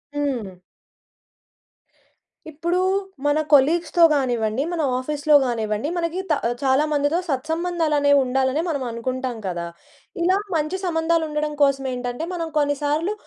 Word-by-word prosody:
హ్మ్. 240 -11 -3 1.9
ఇప్పుడూ, 340 +4 -1 0.4
మన 290 +1 +3
కొలీగ్స్‌తో 330 +4 +4
గానివ్వండి, 245 -3 0
మన 330 - -1 0.2
ఆఫీస్‌లో 295 +3 +1
గానివ్వండి, 220 +1 -2
మన 340 -1 0
గీత 375 -2 -4 0.2
ఆహ్, 240 - 0
చాలా 270 +2 +3
మందితో 290 +3 +1
సత్సంబంధాలనేవి 305 -1 +1
ఉండాలనే, 265 +3 +1
మనం 285 -5 -2
అనుకుంటాం 250 +1 -3
కదా! 175 -2 -3 0.6
ఇలా 375 +2 +3 0.2
మంచి 310 +4 -1
సంబంధాలుండడం 320 -3 0
కోసమేంటంటే, 265 -1 0
మనం 335 -2 -3
కొన్ని 290 -1 +2
సార్లు 315 +7 0
290 Hz, 115 wpm, -22 LUFS, 255-320 Hz, 1.9 s, కొలీగ్స్‌తో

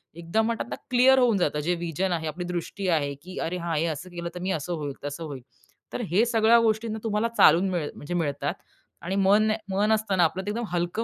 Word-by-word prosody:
एकदम 170 +7 0
म्हणतात 230 0 -1
ना - - -3 0.2
क्लिअर 260 +2 +6
होऊन 235 -5 +3
जातं 150 -4 0
जे 175 0 +1
व्हिजन 175 +2 -2
आहे 160 -2 -1
आपली 175 +4 -4
दृष्टी 180 +2 -4
आहे, 145 -4 +1
की 185 +1 -10
अरे 180 +2 -2
हां, 170 -2 -3
हे 165 - +1
असं 160 +4 -5
केलं 170 -1 -5
तर - - -5
मी 190 +1 -1
असं 160 +2 -2
होईल, 145 -4 -4
तसं 145 +3 -5
होईल. 140 -5 -7 0.5
तर - - -3
हे 215 +6 +4
सगळ्या 230 0 +4
गोष्टी 225 0 +1
ना 220 0 -4
तुम्हाला 220 +1 0
चालून 185 +3 +6
मिळ 170 -5 -1
म्हणजे 150 +4 -6
मिळतात 150 -5 -1 0.5
आणि 185 +3 -2
मन 205 +3 +4 0.2
मन 205 +3 +1
असतं 215 -3 0
ना 175 - +5
आपलं 185 +4 0
ते - - -3
एकदम 235 +1 -3
हलकं 175 +6 -1
180 Hz, 235 wpm, -26 LUFS, 165-215 Hz, 0.5 s, क्लिअर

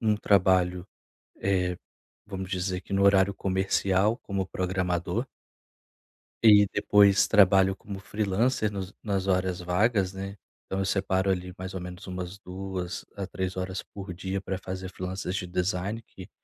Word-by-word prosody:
um 110 -3 +2
trabalho, 90 -3 +3 0.5
eh, 90 -2 +1 0.5
vamos 95 -2 -6
dizer 90 0 -1
que 100 - -7
no 100 0 +3
horário 100 0 +5
comercial 95 +3 +1
como 100 -5 -3
programador 90 +3 -1 1.2
e 105 -2 +8
depois 100 0 +5
trabalho 95 -2 +5
como 95 0 -8
freelancer 105 +3 0
nos 95 -1 -5
nas 100 -2 -1
horas 95 -1 +1
vagas, 95 +2 +1
né. 100 +1 -6 0.3
Então 95 - -3
eu 95 - 0
separo 95 0 +1
ali 90 -1 -1
mais 95 +1 -6
ou 95 - -4
menos 90 +2 -8
umas 90 +1 -5
2 95 -2 -5
a 100 -1 -4
3 95 0 -4
horas 95 0 -3
por 95 -2 -8
dia 95 +2 -3
pra 95 0 -4
fazer 95 0 -6
freelancers 95 +1 -4
de 95 - -2
design 90 +4 -1
que 95 -4 -13
95 Hz, 150 wpm, -27 LUFS, 90-100 Hz, 1.2 s, e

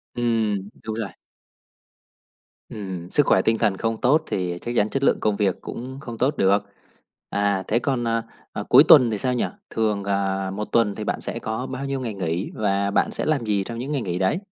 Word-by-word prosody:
Ừm, 110 -5 0
đúng 110 -1 -4
rồi. 110 -3 -3 1.6
Ừm. 95 -4 -6
Sức 145 - +3
khỏe 95 - +4
tinh 115 +3 +2
thần 95 -3 +1
không 115 +1 -2
tốt 150 +5 +4
thì 90 -2 -2
chắc 120 - -4
chắn 105 -2 +2
chất 135 +3 -2
lượng - - +3
công 105 -1 +1
việc 100 -3 0
cũng 130 +3 -7
không 120 -5 -7
tốt 135 +5 +1
được. 100 +1 +3 0.7
À, 100 -1 0
thế 115 - +2
còn, 125 -1 -1
ờ, 115 0 0 0.3
ờ, - - -4
cuối - - +9
tuần 120 -2 +8
thì 105 - -1
sao 125 +4 0
nhỉ? 125 - +1 0.2
Thường, 105 -3 0
ờ, 95 -1 -1
một 105 +2 -3
tuần 110 -4 +2
thì - - -5
bạn - - -2
sẽ - - -3
có 110 +3 -3
bao 130 +1 -5
nhiêu 135 -1 -2
ngày 120 -4 -4
nghỉ, 90 -1 -2
và 100 -1 0
bạn - - +2
sẽ - - -1
làm 150 -6 +1
gì 105 -2 +1
trong 115 +3 -6
những 135 +4 -4
ngày 140 -3 0
nghỉ 90 -4 -3
đấy? 95 - +1
110 Hz, 220 wpm, -23 LUFS, 100-120 Hz, 1.6 s, cuối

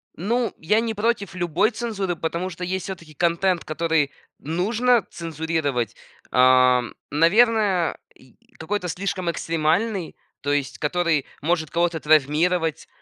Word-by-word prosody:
Ну, 230 +5 0
я 210 +7 +2
не 225 -1 -1
против 210 -3 -1
любой 175 +5 +1
цензуры, 215 -6 -3
потому 170 +3 -3
что 180 +1 -8
есть 185 0 -2
всё-таки 170 -5 -8
контент, 170 +3 +1
который 160 -2 0 0.3
нужно 220 - +1
цензурировать, 160 - -2 0.4
ам, 125 -1 +4 0.2
наверное, 195 +1 +3 0.2
и 130 -2 -21 0.2
какой-то 180 +2 -2
слишком 185 0 -2
экстремальный, 165 +4 -1 0.3
то 145 - -1
есть 140 -1 -1
который 165 -2 +1 0.2
может 160 0 0
кого-то 170 -1 0
травмировать, 155 +3 +2
170 Hz, 120 wpm, -23 LUFS, 155-195 Hz, 0.4 s, ам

